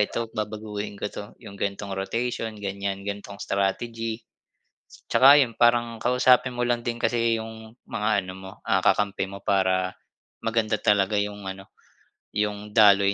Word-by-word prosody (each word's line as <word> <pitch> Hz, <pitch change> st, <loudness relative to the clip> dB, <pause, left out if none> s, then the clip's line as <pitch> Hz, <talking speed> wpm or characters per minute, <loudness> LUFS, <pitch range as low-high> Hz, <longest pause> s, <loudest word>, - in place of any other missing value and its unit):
eto 115 Hz, +2 st, -1 dB
babaguhin 105 Hz, -1 st, -4 dB
ko 105 Hz, -, -1 dB
'to 100 Hz, -, -6 dB, 0.2 s
'yung 100 Hz, -3 st, -10 dB
ganong 100 Hz, -1 st, -3 dB
rotation 115 Hz, +3 st, -2 dB
ganyan 100 Hz, 0 st, -3 dB
gantong 100 Hz, 0 st, -6 dB
strategy. 115 Hz, +3 st, -2 dB, 0.9 s
Tsaka 135 Hz, +5 st, +8 dB
yun 120 Hz, -4 st, 0 dB
parang 120 Hz, -1 st, +3 dB
kausapin 125 Hz, 0 st, +4 dB
mo 120 Hz, -, -1 dB
lang 120 Hz, 0 st, +1 dB
din 120 Hz, 0 st, -2 dB
kasi 115 Hz, -1 st, +2 dB
'yung 110 Hz, 0 st, -10 dB, 0.2 s
mga 110 Hz, -3 st, -1 dB, 0.2 s
ano 95 Hz, -, -7 dB
mo, 95 Hz, 0 st, -9 dB
ah, -, -, +3 dB
kakampi 100 Hz, -2 st, +2 dB
mo 100 Hz, 0 st, -9 dB
para 95 Hz, -1 st, +2 dB, 0.5 s
maganda 115 Hz, -1 st, +1 dB
talaga 105 Hz, 0 st, +3 dB
'yung 105 Hz, 0 st, -5 dB
ano 95 Hz, 0 st, -8 dB, 0.7 s
'yung 105 Hz, 0 st, -2 dB
daloy 100 Hz, -2 st, +6 dB
105 Hz, 145 wpm, -25 LUFS, 100-115 Hz, 0.9 s, Tsaka